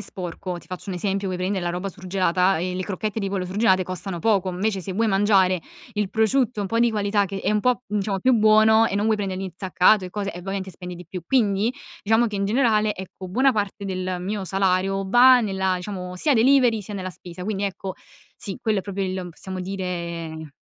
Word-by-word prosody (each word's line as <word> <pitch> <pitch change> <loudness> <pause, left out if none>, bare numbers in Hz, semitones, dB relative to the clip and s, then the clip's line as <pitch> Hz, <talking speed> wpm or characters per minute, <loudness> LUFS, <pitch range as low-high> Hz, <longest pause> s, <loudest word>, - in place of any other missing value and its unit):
sporco, 180 -2 -5
ti - - -17
faccio 185 +2 -8
un 190 - -2
esempio, 195 +2 -1
vuoi 185 -1 -2
prendere 185 0 -2
la 175 - 0
roba 180 +3 -3
surgelata 185 -1 +1
e 180 +2 -2
le 185 - -2
crocchette 205 +2 -3
di 200 -2 -2
pollo 190 -2 -2
surgelate 190 0 +2
costano 185 0 -4
poco, 195 -3 +2
invece 195 +2 -1
se 190 +1 -4
vuoi 225 +4 +1
mangiare 195 -2 +3 0.3
il 210 -2 0
prosciutto 225 +1 +1
un 200 - -2
po' 230 - 0
di 235 -1 +3
qualità 205 -1 +1
che 195 0 -5
è - - 0
un 210 - +2
po' 250 +2 +1
diciamo 200 -2 -1
più 260 +4 +3
buono 220 0 +5
e 200 - -3
non 205 +2 +1
vuoi 220 -1 +3
prendere 190 -2 -3
l'insaccato 190 +1 +2
e 180 - -7
cose, 200 0 -3
e 175 - -8
ovviamente 190 +1 -4
spendi 180 +1 -8
di 175 +1 -10
più. 180 +2 -7
Quindi, 215 -3 +2 0.3
diciamo 225 +3 +3
che 210 - -4
in 200 - 0
generale, 215 -1 +2
ecco, 190 0 -9
buona 260 +9 +3
parte 205 -3 -3
del 185 -1 -3
mio 200 +2 -3
salario 195 +1 +1
va 245 +5 +7
nella 190 -3 0
diciamo 180 0 -5
sia 280 - +2
delivery 245 -2 +4
sia 205 - -7
nella 185 -1 -4
spesa. 180 0 -9
Quindi, 200 0 -2
ecco, 195 -1 -4 0.4
sì. 195 - -6
Quello 215 -3 +1
è - - 0
proprio 200 -1 -4
il 185 -1 -3
m - - -7
possiamo 185 +3 -7
dire 170 -4 -5
195 Hz, 220 wpm, -23 LUFS, 185-215 Hz, 0.4 s, va